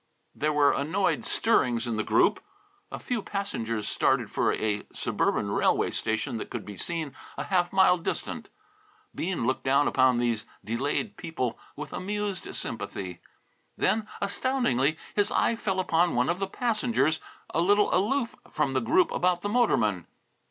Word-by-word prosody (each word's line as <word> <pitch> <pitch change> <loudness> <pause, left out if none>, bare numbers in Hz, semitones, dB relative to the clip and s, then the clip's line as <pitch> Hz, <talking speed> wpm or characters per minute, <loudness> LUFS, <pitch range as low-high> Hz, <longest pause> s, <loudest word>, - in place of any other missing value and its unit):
There 155 +1 0
were 145 -1 +4
annoyed 160 +7 0
stirrings 125 - +2
in 120 -2 -2
the 110 - 0
group. - - +3 0.5
A - - -4
few 245 -3 -2
passengers 115 - -3
started - - +1
for - - +2
a 105 -1 -1
suburban - - 0
railway - - +2
station 110 +1 -1
that - - -6
could - - -5
be 105 - -8
seen 160 - -3 0.2
a - - -2
half 180 -2 +1
mile 190 -2 +5
distant. - - -4 0.6
Bean 175 -7 -2
looked 130 - 0
down 140 +2 +3
upon 130 -2 +4
these 120 -3 0 0.2
delayed 140 - -2
people 130 -9 -3 0.2
with 150 - -7
amused 205 0 -3
sympathy. 90 -3 -5 0.6
Then, 215 -1 +1
astoundingly, 200 - +1 0.2
his 205 -1 +2
eye 230 - +2
fell 195 -4 -1
upon 175 -1 +2
one 125 +1 +2
of 175 +2 0
the 195 - -1
passengers 225 -7 0 0.3
a 165 - +1
little 205 +4 +3
aloof 230 +6 +1
from 135 - 0
the 130 - +1
group 360 +2 +3
about 180 -1 +1
the 205 - -1
motorman. 110 - +2
170 Hz, 155 wpm, -27 LUFS, 125-205 Hz, 0.6 s, mile